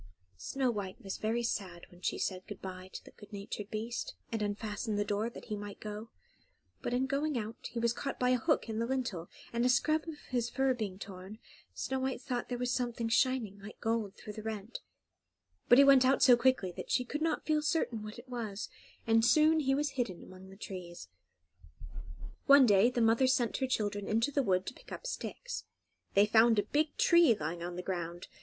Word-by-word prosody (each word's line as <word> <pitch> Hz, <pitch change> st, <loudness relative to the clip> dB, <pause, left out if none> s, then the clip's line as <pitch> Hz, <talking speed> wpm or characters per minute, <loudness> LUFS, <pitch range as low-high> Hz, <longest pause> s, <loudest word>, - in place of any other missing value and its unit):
Snow 265 Hz, -, 0 dB
White 200 Hz, -4 st, -5 dB
was 195 Hz, -1 st, -5 dB
very 230 Hz, +2 st, 0 dB
sad 185 Hz, -6 st, -3 dB
when 175 Hz, 0 st, -17 dB
she -, -, -1 dB
said 185 Hz, -1 st, -3 dB
good 205 Hz, -, -8 dB
bye 185 Hz, 0 st, -8 dB
to -, -, -8 dB
the -, -, -13 dB
good 205 Hz, 0 st, -15 dB
natured 205 Hz, 0 st, -6 dB
beast, 225 Hz, +3 st, -4 dB, 0.2 s
and 225 Hz, -1 st, -2 dB
unfastened 210 Hz, +1 st, -2 dB
the 205 Hz, -, +1 dB
door, 210 Hz, +3 st, -1 dB
that -, -, -11 dB
he 215 Hz, -, -3 dB
might 205 Hz, -1 st, -7 dB
go; 215 Hz, +1 st, -7 dB, 0.7 s
but -, -, -3 dB
in 250 Hz, +2 st, +1 dB
going 280 Hz, +1 st, -1 dB
out 220 Hz, 0 st, -5 dB
he 235 Hz, -, -8 dB
was 235 Hz, 0 st, +2 dB
caught 275 Hz, +3 st, -4 dB
by 250 Hz, 0 st, +3 dB
a 250 Hz, -, +3 dB
hook 305 Hz, +2 st, +1 dB
in 220 Hz, -1 st, -3 dB
the 230 Hz, -, 0 dB
lintel, 235 Hz, -10 st, -2 dB, 0.2 s
and 235 Hz, 0 st, +1 dB
a 250 Hz, -, +3 dB
scrap 310 Hz, +6 st, +2 dB
of 320 Hz, -2 st, -6 dB
his 240 Hz, -2 st, 0 dB
fur 265 Hz, +1 st, +2 dB
being 210 Hz, -6 st, -4 dB
torn, 195 Hz, +1 st, -9 dB, 0.4 s
Snow 265 Hz, 0 st, -2 dB
White 265 Hz, 0 st, -2 dB
thought 245 Hz, -2 st, -3 dB
there 245 Hz, -, -2 dB
was 245 Hz, 0 st, -1 dB
something 240 Hz, -2 st, -1 dB
shining 235 Hz, -5 st, +1 dB
like 210 Hz, +2 st, -11 dB
gold 225 Hz, -3 st, -1 dB
through 210 Hz, -, -9 dB
the 215 Hz, -, -7 dB
rent; 220 Hz, 0 st, -5 dB, 0.9 s
but 245 Hz, -, +8 dB
he 280 Hz, -, +9 dB
went 275 Hz, -2 st, +7 dB
out 265 Hz, +1 st, +4 dB
so 250 Hz, -, +8 dB
quickly 240 Hz, -6 st, +2 dB
that -, -, -8 dB
she 250 Hz, -, +1 dB
could 295 Hz, +5 st, -4 dB
not 320 Hz, -1 st, 0 dB
feel 305 Hz, -1 st, +2 dB
certain 285 Hz, -7 st, 0 dB
what 215 Hz, +1 st, -8 dB
it 240 Hz, +2 st, -12 dB
was, 225 Hz, -5 st, -5 dB, 0.4 s
and 225 Hz, 0 st, +4 dB
soon 310 Hz, +6 st, +5 dB
he 270 Hz, -2 st, +2 dB
was 290 Hz, 0 st, 0 dB
hidden 240 Hz, -9 st, -3 dB
among 185 Hz, +1 st, -13 dB
the 195 Hz, -, -12 dB
trees. 175 Hz, -, -8 dB, 1.4 s
One 280 Hz, -1 st, +9 dB
day 205 Hz, +1 st, +5 dB
the 245 Hz, -1 st, -1 dB
mother 230 Hz, +3 st, +4 dB
sent 250 Hz, -3 st, +1 dB
her 265 Hz, -, 0 dB
children 205 Hz, -4 st, -1 dB
into 230 Hz, +6 st, +1 dB
the 280 Hz, -, +2 dB
wood 185 Hz, -6 st, +1 dB
to -, -, -5 dB
pick -, -, -17 dB
up -, -, -7 dB
sticks. -, -, -5 dB, 0.5 s
They 200 Hz, +1 st, +7 dB
found 225 Hz, +1 st, +5 dB
a 205 Hz, -, +3 dB
big 295 Hz, +8 st, 0 dB
tree 340 Hz, -9 st, +6 dB
lying 170 Hz, +1 st, -3 dB
on 175 Hz, +1 st, -4 dB
the 180 Hz, -, -5 dB
ground. 175 Hz, -2 st, -4 dB
230 Hz, 215 wpm, -32 LUFS, 205-260 Hz, 1.4 s, he